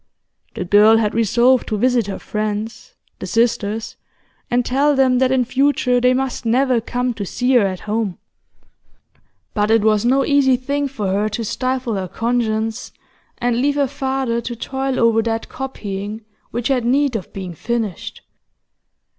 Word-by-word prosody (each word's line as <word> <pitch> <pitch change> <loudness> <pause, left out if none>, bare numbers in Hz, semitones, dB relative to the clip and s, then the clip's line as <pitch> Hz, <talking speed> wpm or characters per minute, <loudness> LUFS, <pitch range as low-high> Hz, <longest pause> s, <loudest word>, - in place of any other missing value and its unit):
The - - -3
girl 210 +4 +6
had 215 -2 0
resolved 235 +3 +3
to 215 - -1
visit 245 -1 +2
her 200 - -4
friends, 215 - -4 0.2
the - - -6
sisters, 225 -2 0 0.5
and 245 0 +1
tell 280 +3 +2
them 260 -2 +3
that 260 0 +2
in 260 -2 +2
future 255 -1 +1
they 250 +1 +4
must 265 -1 -2
never 250 +1 +2
come 245 +2 -2
to 215 - -5
see 250 +6 -1
her 230 -6 +5
at 185 -1 -5
home. 210 -3 -2 1.4
But 210 0 0
it 225 -1 +4
was 215 -1 +3
no 265 +3 +3
easy 280 -3 +4
thing 280 +3 -2
for 215 -8 -4
her 205 +3 0
to 225 +2 -4
stifle 255 +1 -2
her 190 -1 -3
conscience, 225 +1 -2 0.5
and 245 0 0
leave 285 +1 +1
her 285 -1 +2
father 265 -3 -2
to 240 +1 -5
toil 265 +3 -3
over 230 -1 +4
that 225 0 -3
copying 215 -7 -6 0.2
which 240 +2 -3
had 255 -3 +1
need 270 +2 +1
of 200 - -5
being 185 -3 -6
finished. 225 0 -4
235 Hz, 165 wpm, -19 LUFS, 215-260 Hz, 1.4 s, girl